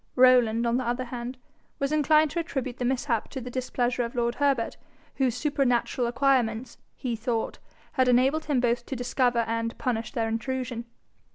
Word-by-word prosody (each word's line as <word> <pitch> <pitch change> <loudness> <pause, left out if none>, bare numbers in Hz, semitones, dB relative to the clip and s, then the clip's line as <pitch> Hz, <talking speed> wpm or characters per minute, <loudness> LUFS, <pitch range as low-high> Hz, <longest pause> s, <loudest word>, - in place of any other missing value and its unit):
Rowland 245 -3 +5
on 235 +1 +2
the 255 - -1
other 245 +1 -1
hand 245 +1 -6 0.4
was 275 +1 -1
inclined 305 0 +4
to 340 - -1
attribute 265 -6 -3
the 250 - -1
mishap 245 -2 0
to 265 - -5
the 250 0 -7
displeasure 245 -1 -1
of 235 +2 -5
lord 235 -1 +1
Herbert, 275 -5 +1 0.4
whose 255 -3 +1
supernatural 250 -3 +1
acquirements, 245 -2 +1 0.2
he 245 -3 -3
thought, 225 0 -2 0.3
had 260 -2 +2
enabled 265 +6 +3
him 290 -4 +1
both 240 0 +1
to 270 - -3
discover 245 -1 +1
and 230 +1 -2
punish 230 -3 -2
their 225 -1 -1
intrusion. 240 +1 -3
250 Hz, 170 wpm, -27 LUFS, 235-265 Hz, 0.4 s, Rowland